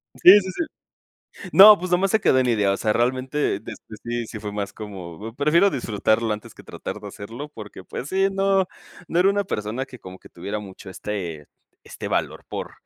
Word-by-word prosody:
Sí, 195 +3 +9
sí, 190 -2 -5
sí. 330 - -2 0.9
No, 210 +2 +10
pues 180 +1 -5
nada 180 - +4
más 195 0 +1
se 220 - +3
quedó 130 - +4
en 130 - +2
idea, 105 -4 +2
o - - -1
sea, 110 - 0
realmente, 130 +3 0
este, 110 +1 -10
sí, 120 0 -3
sí 110 - -8
fue 105 -1 -6
más 100 -1 -4
como: 105 0 -8
"Prefiero 150 +8 +4
disfrutarlo 110 - 0
antes 105 0 -7
que - - -14
tratar - - -7
de - - -8
hacerlo". 115 +9 -8
Porque, 105 -5 -10
pues 130 - -6
sí, 195 +2 +2
no 195 -1 +2 0.4
no 170 - 0
era 190 - +5
una 200 0 +1
persona 110 - -3
que 130 -2 -13
como 95 -3 -11
que - - -16
tuviera 105 +1 -5
mucho 95 -1 -11
este 90 -6 -5 0.4
este - - -7
valor - - -2
por - - -5
120 Hz, 205 wpm, -23 LUFS, -, 0.9 s, No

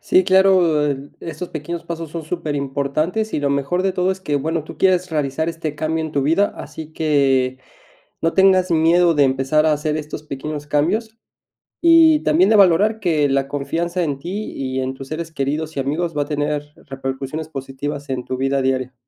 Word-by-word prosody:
Sí, 185 - +3
claro, 185 -5 +4
en 140 0 -4
estos 165 +2 -6
pequeños 170 +2 -5
pasos 165 -2 -6
son 165 -2 -6
superimportantes, 155 +5 -2
y - - -1
lo 140 - +1
mejor 140 +6 0
de 190 -1 +1
todo 180 0 +1
es 190 0 -4
que, 150 -6 -1
bueno, 160 +3 -1
tú - - -10
quieres 185 -1 +2
realizar 150 +1 -1
este 160 -2 -4
cambio 160 +1 -2
en 155 - -6
tu 140 - +1
vida, 165 +8 +2
así 155 0 -9
que 135 -5 +1 0.6
no 165 - +2
tengas 190 -1 +4
miedo 170 +1 +4
de 145 -2 +4
empezar 135 +4 +2
a 155 - +4
hacer 150 +1 -1
estos 150 0 -6
pequeños 150 +1 -6
cambios, 215 +10 0 0.6
y 330 -2 +6
también 165 +6 +3
de 220 - +5
valorar 200 +3 +4
que 160 -7 +1
la 135 0 +1
confianza 165 +6 -2
en 145 -4 -2
ti 190 +8 -5
y 130 -1 -3
en 130 0 -3
tus 135 0 -10
seres 160 +1 -5
queridos 150 +2 -3
y 135 - 0
amigos 155 +4 -2
va 145 - +1
a - - 0
tener 145 0 -3
repercusiones 135 +3 -5
positivas 140 0 -6
en 130 -2 -3
tu 130 - -3
vida 135 0 +1
diaria. 130 -1 -1
155 Hz, 190 wpm, -20 LUFS, 140-175 Hz, 0.6 s, y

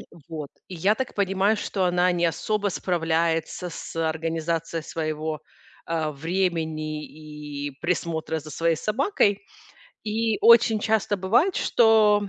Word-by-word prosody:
Э, - - -9 0.3
вот. 155 -3 -6 0.2
И 185 - -7
я 190 +5 +2
так 260 +2 -4
понимаю, 200 +2 +2
что 195 -2 -1
она 180 0 +3
не 175 -1 +1
особо 205 +5 -1
справляется 165 -1 -1
с - - -8
организацией 165 0 -2
своего, 155 0 -3 0.5
э, 160 -2 -1
времени 160 -1 -2 0.6
и - - -7
присмотра 165 -2 -1
за 155 +1 -11
своей 165 +2 +1
собакой. 215 - +1 0.6
И 220 0 0
очень 230 -1 +6
часто 215 -1 +1
бывает, 225 - +2
что 215 -3 +4
175 Hz, 125 wpm, -25 LUFS, 160-205 Hz, 0.6 s, очень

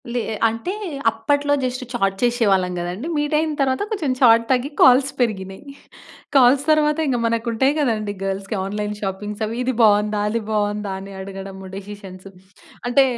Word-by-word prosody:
లే 245 - 0
ఎ - - -3
అంటే 230 - -3 0.4
అప్పట్లో 285 +6 0
జస్ట్ 255 0 -2
చాట్ 195 -6 0
చేశేవాళ్ళం 210 -7 +2
గదండీ. 180 - -4
మీట్ 295 +1 -1
అయిన 315 0 0
తరువాత 265 +5 +1
కొంచెం 325 -11 -1
చాట్ 230 -3 +6
తగ్గి 260 +2 +1
కాల్స్ 260 +2 +6
పెరిగినయి. 195 -1 -2 0.7
కాల్స్ 265 +1 +6
తరువాత, 300 0 +3
ఇంగ 255 -3 0
మనకుంటయి 230 +3 +1
గదండీ! 215 -7 -1
గర్ల్స్‌కి 195 +2 -3
ఆన్లైన్ 210 +1 -3
షాపింగ్స్ 205 +2 -4
అవి. 225 +2 -5
"ఇది 255 +1 -1
బాగుందా? 210 -1 +3
అది 230 +1 -1
బాగుందా?" 205 -1 -1
అని 195 0 -10
అడగడము 195 0 -8
డిసిషన్స్. 195 -1 -10 0.6
అంటే 270 +3 +5
225 Hz, 150 wpm, -21 LUFS, 200-260 Hz, 0.7 s, చాట్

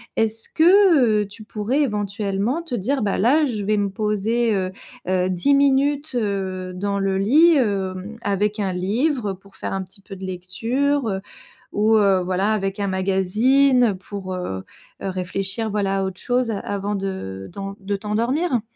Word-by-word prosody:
est-ce 225 0 -1
que, 320 - +5
heu, - - -8
tu 205 +2 -13
pourrais 215 +7 -1
éventuellement 205 - -1
te 285 -7 -4
dire: 255 +6 -1
«Bah 205 -2 0
là 285 +9 +4
je 215 -5 -3
vais 210 +1 +1
me 200 -1 +1
poser, 215 +3 0
heu 185 -1 -1 0.4
heu, 185 0 +1
10 185 +10 +2
minutes, 280 +1 +2
heu, 195 -4 -2
dans 200 +2 -1
le 195 -1 0
lit, 295 - +5
hem, 195 -2 -1
avec 205 +1 0
un 195 -2 -1
livre»? 220 - 0
Heu, - - -5
pour 195 +1 -21
faire - - -5
un 195 0 -2
petit 190 +2 -18
peu 195 0 -10
de 190 - -7
lecture, 230 +10 -1
heu, 190 -1 -2 0.5
ou 215 +2 +3
heu, 195 -3 +4
voilà 185 +3 0
avec 195 -1 -2
un 200 - 0
magazine 210 +6 +3
pour, 190 0 -6
heu 95 - -4 0.4
heu, 195 - -1
réfléchir 195 +4 -3
voilà 195 -2 0
à - - 0
autre 190 -1 -4
chose 245 -1 0
avant 205 0 -3
de 145 - -5
dans 195 0 -6
de 200 +1 -2
t'endormir. 235 - 0
205 Hz, 175 wpm, -22 LUFS, 190-240 Hz, 0.5 s, que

